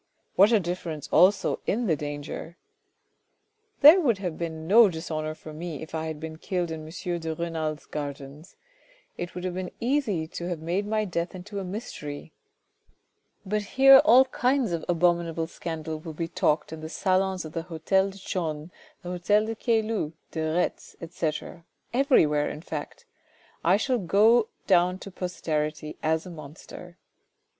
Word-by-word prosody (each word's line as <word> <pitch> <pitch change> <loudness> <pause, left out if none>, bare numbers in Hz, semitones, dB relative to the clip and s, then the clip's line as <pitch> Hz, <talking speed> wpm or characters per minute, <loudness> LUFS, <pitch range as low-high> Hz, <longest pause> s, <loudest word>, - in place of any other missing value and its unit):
What 200 +4 +6
a 225 - +5
difference 170 -4 -4
also 195 +3 +4
in 235 +3 0
the 165 -7 +2
danger! 145 +3 -6 0.6
" 430 0 -46
"There 310 +6 +9
would 240 - +2
have 180 -4 -4
been 160 -1 -5
no 220 +2 +7
dishonour 155 -2 -4
for 155 0 -11
me 160 -1 -6
if 160 - -11
I 160 0 -2
had 155 -1 -5
been 160 0 -7
killed 175 -2 -2
in 155 -1 -6
M. 175 +1 -4
de 160 -1 -4
Renal's 160 -2 -3
gardens. 145 +3 -7 0.6
It 175 0 -6
would 180 - -5
have 185 -1 -2
been 185 0 -4
easy 230 - 0
to 175 0 -5
have 175 -3 -3
made 175 +6 -2
my 215 0 0
death 170 -1 -3
into 200 +3 -6
a - - -4
mystery. 165 -7 -7 1.1
But 210 +2 0 0.2
here 270 0 +10
all 255 +2 +7
kinds 255 -3 +1
of 165 -2 -2
abominable 170 -1 +1
scandal 160 -1 -5
will 160 0 -8
be 165 +2 -3
talked 165 -3 0
in 160 - -7
the 160 - -6
salons 190 0 0
of 155 - -9
the 165 - -2
hotel 190 +4 +1
de 195 - -11
Chaulnes, 165 -4 -4 0.3
the 175 - -6
hotel 205 +4 +2
de 225 - -3
Caylus, 220 - 0 0.2
de 160 - -3
Retz, 160 +3 -1
etc., 165 0 -4 0.3
everywhere 200 - +3
in 150 - -7
fact. 155 -4 -7 0.6
I 180 +4 +4
shall 250 +3 0
go 215 +5 +4 0.2
down 180 -1 +3
to 195 - -10
posterity 155 -4 -3
as 160 +2 0
a 180 - -8
monster." 165 +3 -11
175 Hz, 165 wpm, -26 LUFS, 160-200 Hz, 1.1 s, here